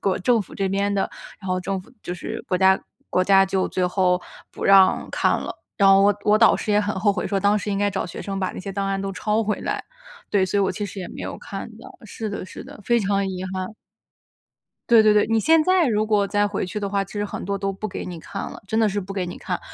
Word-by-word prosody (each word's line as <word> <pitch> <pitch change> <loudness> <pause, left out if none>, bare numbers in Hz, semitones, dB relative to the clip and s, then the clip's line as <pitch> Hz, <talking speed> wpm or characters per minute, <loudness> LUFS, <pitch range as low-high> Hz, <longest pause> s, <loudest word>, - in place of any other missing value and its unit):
国 195 - +1
政 225 +3 +2
府 - - -14
这 195 -1 -1
边 200 +1 0
的， 195 - 0 0.3
然 190 - -7
后 185 - +1
政 190 +1 -3
府 205 - -18
就 180 - -5
是 175 - -6
国 180 - 0
家 190 0 +5 0.3
国 185 - +1
家 195 0 +5
就 190 0 0
最 180 -1 0
后 180 -1 +2 0.3
不 - - -9
让 195 -1 +5
看 - - +1
了。 - - -5 0.2
然 195 -1 +6
后 195 0 +7
我 205 +1 +5
我 210 0 +5
导 225 +1 +5
师 210 - -2
也 210 - +4
很 205 0 -1
后 205 0 +3
悔 - - -3
说 195 0 0
当 205 +2 +3
时 205 0 -3
应 200 - -1
该 205 0 +2
找 195 -1 -2
学 175 - -7
生 195 -1 -4
把 185 - -1
那 - - -9
些 195 +1 -6
档 195 0 -2
案 195 0 -1
都 195 0 -3
抄 215 +3 0
回 210 - -1
来， - - -2 0.5
对， 195 -2 +2
所 190 +2 0
以 - - +3
我 195 - +1
其 210 - -4
实 200 0 -7
也 180 - -5
没 - - -8
有 - - -5
看 195 +3 -7
到。 - - -11 0.2
是 220 +1 -5
的 200 -2 -5
是 185 - -10
的， - - -12
非 235 0 +3
常 200 -1 +1
遗 185 0 -4
憾。 185 0 -4 1.2
对 230 -2 +7
对 215 -1 +5
对， 210 0 +4
你 225 0 +2
现 320 +7 +4
在 370 -1 +3
如 215 -3 +1
果 205 -2 +2
再 205 +1 +1
回 200 - -2
去 185 +3 -5
的 200 - -2
话， 195 0 0
其 - - -15
实 205 - -2
很 205 - -5
多 200 +1 -2
都 195 0 -1
不 195 +2 -5
给 200 - -6
你 175 -2 -6
看 195 +4 -6
了， - - -9
真 220 +3 0
的 220 - +4
是 205 0 -2
不 195 0 -5
给 185 -2 -2
你 175 - -7
看。 - - -4
200 Hz, 300 characters per minute, -23 LUFS, 190-210 Hz, 1.2 s, 后